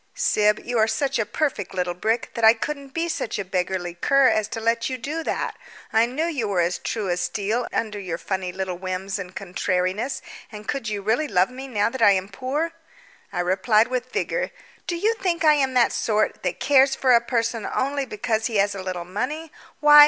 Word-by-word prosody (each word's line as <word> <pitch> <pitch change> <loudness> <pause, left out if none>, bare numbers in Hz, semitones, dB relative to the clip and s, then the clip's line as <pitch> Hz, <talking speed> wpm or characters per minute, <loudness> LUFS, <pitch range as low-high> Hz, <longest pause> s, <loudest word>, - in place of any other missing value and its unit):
"Syb, 210 0 +3
you 240 -1 0
are 220 - +4
such 265 +3 0
a 220 - 0
perfect 235 - -2
little 180 -1 0
brick 220 +6 -1
that 230 - -4
I 220 +1 +8
couldn't 280 +4 -4
be 330 +4 -1
such 315 -8 -2
a 200 - -3
beggarly 180 -1 -2
cur 275 +9 +4
as 215 -1 +1
to 225 - -5
let 230 +2 +1
you 260 - -3
do 295 +7 -3
that. - - -2 0.4
I 225 +1 +5
knew 280 +7 -1
you 285 -10 -1
were 195 -3 0
as 175 +1 0
true 215 -4 -3
as 175 - 0
steel 220 +4 -1
under 215 -2 -2
your 175 -4 -4
funny 190 0 -3
little 185 -1 -4
whims 190 +2 -3
and 185 -1 -7
contrariness; 185 +6 -1 0.3
and 210 -1 -9
could 270 -6 -2
you 205 -2 -3
really 235 +9 +1
love 185 -2 +2
me 260 +1 -7
now 215 -3 +1
that 260 - -5
I 205 -2 +7
am 190 0 -1
poor?" 270 +10 -2 0.6
I 175 -3 -1
replied 210 +6 +3
with 255 0 -3
vigour: - - -1 0.4
"Do 345 - -1
you 425 +7 +2
think 340 -3 0
I 305 - +8
am 270 -3 +1
that 245 -2 +5
sort, 215 -1 0
that - - -2
cares 270 -1 +5
for 260 -2 +3
a 235 - +6
person 230 -2 -1
only 275 +1 -1
because 220 0 -1
he 230 - -5
has 200 0 +3
a 195 - -5
little 180 -2 -4
money? 275 - -4 0.3
Why! 295 0 +9
225 Hz, 215 wpm, -24 LUFS, 195-265 Hz, 0.6 s, Why